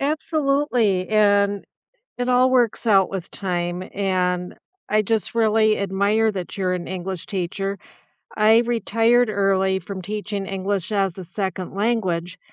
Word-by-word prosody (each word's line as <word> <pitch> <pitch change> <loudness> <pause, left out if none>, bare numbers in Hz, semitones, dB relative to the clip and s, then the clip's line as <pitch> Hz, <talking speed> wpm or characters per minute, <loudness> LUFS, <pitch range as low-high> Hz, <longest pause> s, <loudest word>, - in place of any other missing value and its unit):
Absolutely, 275 - +1
and 205 -1 +2 0.5
it 245 0 -1
all 255 +1 +4
works 240 -2 +1
out 195 -4 +4
with 190 -2 -5
time, 175 -2 -3
and 180 -2 -1 0.3
I 215 0 +2
just 220 +1 -1
really 220 -1 +3
admire 200 +3 +1
that 185 -2 -6
you're 185 -2 0
an 180 -1 -3
English 185 -1 -5
teacher. 195 +1 -3 0.6
I 220 +1 +5
retired 235 0 +2
early 195 -2 +1
from 190 +1 -7
teaching 205 +1 -4
English 195 0 -3
as 195 -4 0
a 190 - -7
2nd 190 0 -4
language, 190 -5 -1
200 Hz, 135 wpm, -22 LUFS, 190-225 Hz, 0.6 s, I